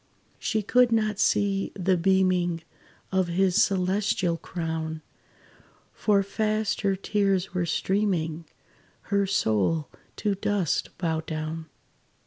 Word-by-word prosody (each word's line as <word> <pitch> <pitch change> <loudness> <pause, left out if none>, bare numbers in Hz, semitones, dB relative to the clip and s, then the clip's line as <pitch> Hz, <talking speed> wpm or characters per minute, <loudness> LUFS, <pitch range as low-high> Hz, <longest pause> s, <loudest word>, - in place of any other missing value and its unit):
She 220 -2 -1
could 245 +3 +4
not 215 -2 +1
see 195 -1 +1
the 190 -1 +2
beaming 180 -2 +2 0.5
Of 190 -1 +2
his 180 +1 +2
celestial 190 -1 +1
crown; 160 -2 -4 0.9
For 200 -2 +2
fast 215 +1 -1
her 195 -2 +1
tears 195 -2 0
were 180 -2 0
streaming; 170 -4 0 0.7
Her 200 -1 +3
soul 145 - +1 0.3
to 210 -2 0
dust 195 -3 0
bowed 160 -2 -2
down. 160 +1 -4
190 Hz, 110 wpm, -26 LUFS, 165-200 Hz, 0.9 s, could